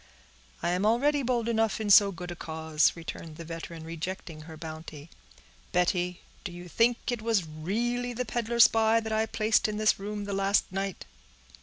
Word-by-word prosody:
"I - - +1
am 180 +2 0
already 275 +7 +3
bold 240 -3 0
enough 225 -2 +1
in 210 -2 0
so 200 0 +8
good 180 -1 -7
a - - -5
cause," 160 -2 +1
returned 165 -1 -8
the 165 - -8
veteran, 165 0 -7
rejecting 165 0 -6
her 160 0 -10
bounty. 160 -1 -9 0.6
"Betty, 180 0 +1 0.2
do 180 - -5
you 175 +1 -9
think 235 +7 +1
it 240 -3 -3
was 220 -5 +1
really 230 +11 -2
the 250 +1 -3
peddler 235 +1 -2
spy 225 -1 +6
that 220 -1 -4
I 220 +1 +1
placed 220 +1 +2
in 210 -1 -3
this 215 -1 +3
room 205 +1 -4
the 200 - -4
last 195 +1 +2
night?" 195 0 -4
195 Hz, 180 wpm, -28 LUFS, 170-225 Hz, 0.6 s, so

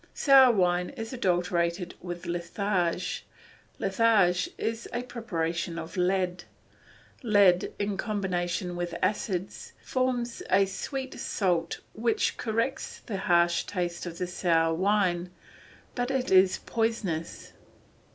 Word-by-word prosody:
Sour 270 -3 +7
wine 180 -2 +2
is 225 +1 -5
adulterated 175 -4 0
with 175 -1 -6
litharge; 175 0 -1 0.5
litharge 195 -3 +3
is 225 +1 -3
a 240 +1 -2
preparation 170 -8 -3
of 160 -1 -7
lead. 180 0 0 0.8
Lead 200 -7 +4
in 200 -1 -2
combination 180 -4 -2
with 175 -1 -3
acids 190 -1 -2
forms 250 -2 -1
a 200 - +5
sweet 260 +7 -5
salt 175 -4 -1
which 225 +1 0
corrects 230 +4 -2
the 205 - -3
harsh 175 -2 +3
taste 175 -2 -3
of 170 -1 -7
the 180 - -1
sour 165 -2 +1
wine, 185 -1 +1 0.6
but 245 0 -2
it 265 -1 -1
is 185 0 +5
poisonous. 225 -8 -2
185 Hz, 110 wpm, -28 LUFS, 175-225 Hz, 0.8 s, Sour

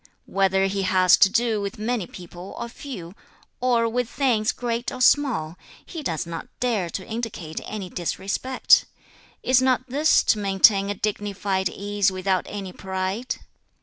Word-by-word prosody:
Whether 195 0 +2
he 195 0 -1
has 185 -1 +5
to 200 - +6
do 230 0 +1
with 200 +4 -4
many 215 -3 -2
people 175 +1 -10
or 235 - -4
few, 210 -10 -8 0.5
or 240 -2 +2
with 245 +1 -1
things 235 -6 +1
great 240 0 -3
or 255 - -7
small, 245 - +2 0.3
he 330 - -7
does 165 - -2
not 165 -1 -6
dare 220 -8 0
to 185 - -5
indicate 220 -8 -5
any 210 -3 -5
disrespect; 195 +9 +1 0.6
is 255 0 +4
not 255 0 +2
this 290 +5 +3
to 215 - +2
maintain 195 0 +4
a 205 - -1
dignified 200 -2 -1
ease 205 0 0
without 185 0 -1
any 195 -3 -6
pride? 190 +5 -3
205 Hz, 150 wpm, -24 LUFS, 190-240 Hz, 0.6 s, to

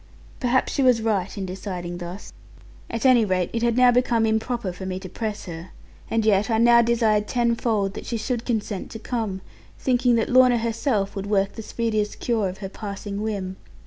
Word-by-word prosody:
Perhaps 255 0 +1
she - - 0
was 250 -3 +5
right 210 -4 -1
in 195 - -3
deciding 180 -2 -5
thus; 175 +3 -8 0.6
at 230 +2 -3
any 250 -3 +6
rate 185 -3 0
it 230 - -1
had 235 0 +1
now 250 -1 +6
become 240 -2 +2
improper 220 -2 -1
for 185 - -9
me 185 0 -3
to 190 - -8
press 215 +2 -4
her. 170 0 -8 0.4
And 225 -1 +1
yet 210 +1 +3
I 225 - +2
now 235 +1 +6
desired 225 -3 +2
tenfold 230 -4 0
that - - -8
she 235 - -2
should 230 +1 -2
consent 215 -5 -3
to 225 - -7
come, 220 -5 -3 0.4
thinking 245 -1 +2
that 225 - +1
Lorna 255 -1 +6
herself 230 -3 -1
would 195 0 -4
work 195 -1 +1
the 225 - -7
speediest 215 -1 -2
cure 220 -5 0
of 185 - -8
her - - -2
passing 200 0 -6
whim. 195 -4 -3
220 Hz, 195 wpm, -24 LUFS, 195-235 Hz, 0.6 s, any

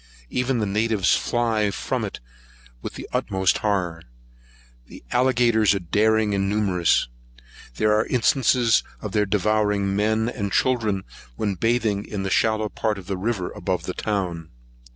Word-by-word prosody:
Even 125 0 0
the 110 - 0
natives 105 0 +1
fly 115 -3 0
from 100 - -3
it - - -5 0.6
with - - -7
the - - -8
utmost 95 -1 +1
horror. 90 -6 -1 0.9
The - - -13
alligators 120 -5 +3
are - - -1
daring 110 +4 +2
and 100 0 0
numerous. 100 -8 +2 0.7
There 105 - +2
are 110 +1 +1
instances 120 -2 +3 0.2
of 105 - -6
their 105 0 +1
devouring 105 -1 +1
men 110 +2 +1
and 100 -5 -3
children 110 -5 +1 0.3
when 100 - -1
bathing 110 0 0
in 100 -2 -5
the 95 - -3
shallow 110 +1 +2
part 105 0 -2
of 95 - -9
the 95 - -3
river 95 -1 -2
above - - -3
the - - -4
town. 90 -6 -3
105 Hz, 150 wpm, -23 LUFS, 100-110 Hz, 0.9 s, alligators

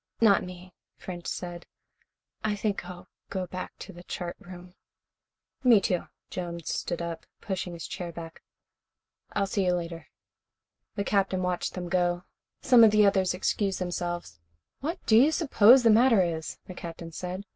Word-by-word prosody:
"Not 210 -4 +5
me," 180 0 -10 0.2
French 175 -2 -7
said. 175 -1 -5 0.8
"I 215 -1 0
think 200 -3 -2
I'll 180 0 -10 0.2
go 190 -2 -2
back 185 +1 -6
to 195 - -9
the 175 - -11
chart 175 -1 -5
room." 180 0 -12 0.9
"Me, 240 -5 +7
too." 180 -2 -1 0.2
Jones 170 -3 -4
stood 170 0 -3
up, 170 -1 -6
pushing 190 -3 -4
his 170 - -7
chair 175 -2 -5
back. 165 0 -9 0.9
"I'll 200 - +1
see 195 0 -1
you 180 -1 +2
later." 170 -3 -4 0.9
The 200 - -1
Captain 195 -2 +1
watched 180 -1 -2
them 180 -1 -4
go. 175 0 +1 0.4
Some 245 -3 +7
of 220 - +9
the 210 0 +5
others 190 -2 +2
excused 195 +1 0
themselves. 175 - -4 0.4
"What 325 +6 -3
do 220 - +4
you 270 +7 +6
suppose 260 -6 +6
the 230 - +6
matter 225 -2 +5
is?" 160 -2 -3
the 185 - -8
Captain 170 -1 -8
said. 180 +4 -5
180 Hz, 160 wpm, -28 LUFS, 175-205 Hz, 0.9 s, of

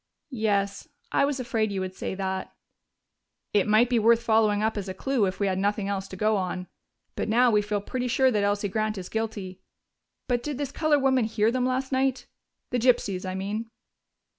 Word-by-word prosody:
"Yes, 200 0 0 0.2
I - - +3
was 280 -1 -2
afraid 225 -4 -1
you 195 - -2
would 185 0 -4
say 190 - -4
that." 190 -1 -4 1.0
"It 205 0 +3
might 215 +3 +5
be 240 -1 +2
worth 230 +1 +4
following 220 -2 +3
up 220 0 +1
as 200 -2 -4
a 185 - -5
clue 260 0 +1
if 185 - -4
we 200 - +1
had 190 -1 0
nothing 205 0 0
else 195 -1 -2
to - - -9
go 215 +2 +2
on. 180 -1 -3 0.5
But - - -2
now 240 +2 +4
we 210 -1 +4
feel 205 0 -2
pretty 250 +4 -3
sure 260 +2 +3
that 210 -3 +1
Elsie 205 0 +1
Grant 215 +1 -1
is 180 -1 -6
guilty.... 205 -4 -4 0.7
But 245 -2 +1
did 290 0 -4
this 280 -1 -3
colored 295 -3 +2
woman 260 -3 +3
hear 220 0 +1
them 250 0 0
last 260 +1 -1
night 260 -1 0 0.5
the 245 - +1
gypsies, 210 -6 +1
I 185 - -4
mean?" 210 +4 -3
215 Hz, 205 wpm, -26 LUFS, 200-250 Hz, 1.0 s, might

